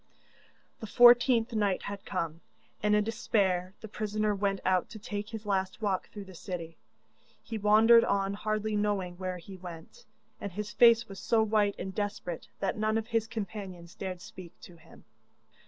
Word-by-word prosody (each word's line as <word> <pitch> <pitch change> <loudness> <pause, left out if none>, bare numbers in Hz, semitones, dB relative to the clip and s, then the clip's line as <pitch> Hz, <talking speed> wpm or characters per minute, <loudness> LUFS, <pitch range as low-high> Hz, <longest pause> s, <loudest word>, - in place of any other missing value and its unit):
The 220 - -7
fourteenth 240 0 +6
night 205 -4 0
had 200 0 -7
come, 165 -3 -3 0.4
and 210 0 +3
in 210 - +3
despair 195 -5 0
the 220 - -7
prisoner 215 0 -1
went 195 -1 -1
out 185 -1 +2
to - - -9
take 210 0 -5
his 220 -2 -7
last 190 -2 -1
walk 200 -4 -1
through 205 - -8
the 190 - -12
city. 170 -2 -6 0.7
He 225 -2 -5
wandered 220 +3 +6
on 195 0 0
hardly 215 +1 -2
knowing 200 -4 -1
where 185 -1 -3
he 190 +2 -11
went, 180 - -11 0.3
and 200 - -6
his 210 +2 -5
face 235 -1 +6
was 195 -1 -9
so 225 -2 +2
white 210 -2 +2
and 190 +1 -5
desperate 205 -5 -4
that 195 +2 -1
none 215 +1 +1
of 225 +1 -4
his 225 -1 0
companions 195 -5 -7
dared 185 -2 -6
speak 175 -2 -12
to 175 - -13
him. 160 - -18
205 Hz, 170 wpm, -30 LUFS, 185-215 Hz, 0.7 s, fourteenth